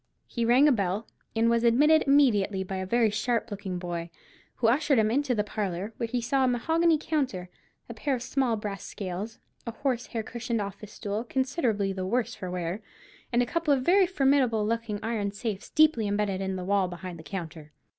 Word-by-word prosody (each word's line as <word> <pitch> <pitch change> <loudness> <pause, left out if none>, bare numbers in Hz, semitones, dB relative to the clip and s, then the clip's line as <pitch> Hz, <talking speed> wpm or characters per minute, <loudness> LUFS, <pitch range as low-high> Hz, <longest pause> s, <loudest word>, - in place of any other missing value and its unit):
He 235 -2 -2
rang 250 +5 +6
a - - +6
bell, 200 -2 -1 0.3
and 225 +1 +3
was 235 0 +2
admitted 295 +7 +5
immediately 210 -9 +3
by 190 0 -5
a 190 0 -4
very 230 +1 +3
sharp 225 +1 -1
looking 195 -3 -4
boy, 175 -1 -4 0.5
who 240 - -2
ushered 275 +3 +3
him 215 -1 +3
into 270 0 +1
the 210 - +1
parlour, 205 0 -3
where 230 - -2
he 245 +2 -1
saw 265 +3 +1
a - - +4
mahogany 320 +7 +2
counter, 265 - -2 0.4
a - - -7
pair 280 -3 -1
of 240 - -5
small 255 -3 0
brass 205 -2 -5
scales, 200 +3 -5 0.3
a - - -1
horse 245 0 -2
hair 225 -2 -3
cushioned 235 +1 -3
office 200 +1 -6
stool 210 +1 -3
considerably 245 - 0
the 190 -1 -4
worse 230 +5 0
for 185 - -6
wear, 180 +3 -3 0.5
and 240 0 +3
a - - -1
couple 330 +4 0
of 265 -2 +2
very 370 +5 +5
formidable 270 - +2
looking 230 -1 -2
iron 215 -3 -1
safes 205 -1 -5
deeply 305 -9 +4
imbedded 200 -2 -1
in 190 0 -2
the 185 -1 -5
wall 200 -1 +2
behind 180 -1 -7
the - - -10
counter. 160 -5 -7
225 Hz, 200 wpm, -27 LUFS, 195-255 Hz, 0.5 s, rang